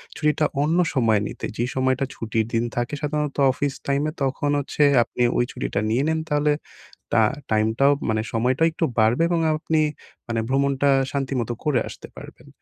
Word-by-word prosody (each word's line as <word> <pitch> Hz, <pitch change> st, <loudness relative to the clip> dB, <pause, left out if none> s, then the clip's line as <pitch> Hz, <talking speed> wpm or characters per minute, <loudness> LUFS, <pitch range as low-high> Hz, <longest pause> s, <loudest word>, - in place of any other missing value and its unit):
ছুটিটা 150 Hz, 0 st, +1 dB, 0.2 s
অন্য 160 Hz, +4 st, +1 dB, 0.2 s
সময় 115 Hz, -6 st, +3 dB
নিতে। -, -, -6 dB
যে 120 Hz, -, 0 dB
সময়টা 130 Hz, +1 st, +1 dB
ছুটির 110 Hz, -1 st, -2 dB
দিন 115 Hz, +1 st, +2 dB
থাকে 120 Hz, +3 st, -2 dB
সাধারণত 150 Hz, -1 st, -2 dB
অফিস 140 Hz, +1 st, -2 dB
টাইমে 145 Hz, +2 st, 0 dB
তখন 135 Hz, +2 st, -1 dB
হচ্ছে 145 Hz, +1 st, 0 dB, 0.2 s
আপনি 125 Hz, -, -6 dB, 0.2 s
ওই -, -, +3 dB
ছুটিটা -, -, -3 dB
নিয়ে 125 Hz, +5 st, +1 dB
নেন 160 Hz, 0 st, +1 dB
তাহলে 150 Hz, 0 st, +2 dB, 0.6 s
তা 110 Hz, -, +5 dB, 0.3 s
টাইমটাও, 110 Hz, +6 st, +3 dB, 0.2 s
মানে 110 Hz, 0 st, +1 dB
সময়টা 125 Hz, +6 st, +1 dB
একটু 165 Hz, +1 st, -2 dB
বাড়বে 110 Hz, +8 st, +3 dB
এবং 170 Hz, -1 st, +1 dB
আ -, -, +2 dB
আ -, -, +3 dB
আপনি 160 Hz, 0 st, 0 dB, 0.5 s
মানে 115 Hz, -1 st, -1 dB
ভ্রমণটা 140 Hz, +1 st, +2 dB, 0.2 s
শান্তিমতো 130 Hz, -4 st, -2 dB
করে 145 Hz, -6 st, +2 dB
আসতে -, -, -10 dB
পারবেন। -, -, -12 dB
135 Hz, 170 wpm, -23 LUFS, 115-150 Hz, 0.6 s, তা